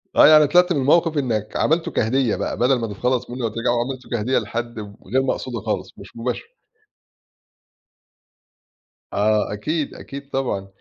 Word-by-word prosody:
آه، - - +8
يعني 155 -1 +7
طلعت 180 +4 +4
من 145 - 0
الموقف 160 +3 +3
إنّك 110 -6 -1
عملته 160 +2 +1
كهدية 120 0 +1
بقى، - - -3
بدل 125 +1 +3
ما 115 - -2
تتخلص 125 +4 -1
منه 125 0 -5
أوترَجّعه 120 +2 0
عملته 130 0 -5
كهدية 120 +3 0
لحد 120 +1 -5
وغير 105 +4 -3
مقصودة 130 -3 -2
خالص، - - -3
مش - - -11
مباشرة. 125 - -3 2.7
آه 105 0 +1
أكيد 150 +9 -2
أكيد 140 0 -9
طبعًا، 110 -8 -2
125 Hz, 145 wpm, -22 LUFS, 110-140 Hz, 2.7 s, آه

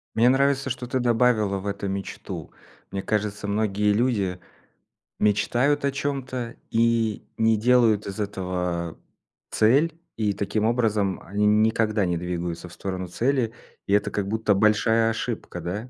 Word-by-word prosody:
Мне 115 +2 +5
нравится, 135 +1 +2
что 125 -1 -4
ты 130 +1 -1
добавила 115 -4 +2
в 100 - -6
это 100 0 -3
мечту. 95 0 -6 0.4
Мне 100 - -3
кажется, 105 -1 -2
многие 105 0 +1
люди 105 -5 0 0.8
мечтают 120 +8 +2
о 140 - +2
чём-то 130 -4 -3
и 115 -2 +1 0.2
не 110 -1 +4
делают 115 -2 +3
из 100 +2 -6
этого 90 -4 -3 0.5
цель, 145 +9 +3 0.2
и 105 -2 0
таким 105 +2 -1
образом 110 -5 +1
они 105 +3 0
никогда 110 -1 +2
не 90 -1 0
двигаются 85 0 -4
в - - -14
сторону 95 -1 -4
цели, 120 +4 0 0.4
и 100 - +1
это 105 - +2
как 100 -2 -2
будто 110 0 +1
большая 110 +2 +3
ошибка, 115 -5 -4
да? 100 +8 -5
110 Hz, 145 wpm, -25 LUFS, 100-120 Hz, 0.8 s, Мне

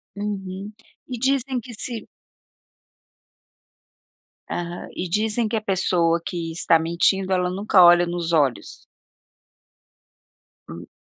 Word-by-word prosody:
Uhum, 200 -1 -5 0.4
e 250 - -4
dizem 265 0 0
que 240 0 -11
se 230 +1 -5 2.4
Aham. 175 0 -5
E 180 - -3
dizem 215 +3 0
que 225 - -2
a 215 - 0
pessoa 180 -4 +1
que 170 -3 -4
está 165 0 +3
mentindo 185 +4 +1
ela 180 -1 +1
nunca 190 0 +4
olha 175 0 +7
nos 170 -1 -3
olhos. 140 -8 0 1.8
Hum. 85 +1 -9
185 Hz, 110 wpm, -23 LUFS, 170-215 Hz, 2.4 s, olha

